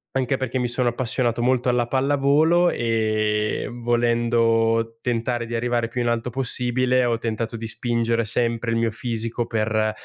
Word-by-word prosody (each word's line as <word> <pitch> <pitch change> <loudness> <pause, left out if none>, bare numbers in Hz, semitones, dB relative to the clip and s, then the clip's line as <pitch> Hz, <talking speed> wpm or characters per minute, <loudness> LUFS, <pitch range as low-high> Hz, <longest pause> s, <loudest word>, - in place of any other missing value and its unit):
anche 135 0 0
perché 130 -1 -2
mi 125 - 0
sono 120 0 0
appassionato 120 -1 -1
molto 125 0 +1
alla 120 -1 +1
pallavolo 145 +6 +3
e 110 -3 0
volendo 115 -1 +1
tentare 120 -1 -1
di 120 - -4
arrivare 120 0 0
più 120 +1 -3
in 120 - 0
alto 120 +1 -1
possibile 125 0 0
ho 115 -1 +1
tentato 115 0 -3
di 115 - -6
spingere 115 0 -1
sempre 115 +1 -1
il 115 - +1
mio 115 -1 +1
fisico 115 0 -3
per 110 -1 0
120 Hz, 155 wpm, -23 LUFS, 115-125 Hz, -, pallavolo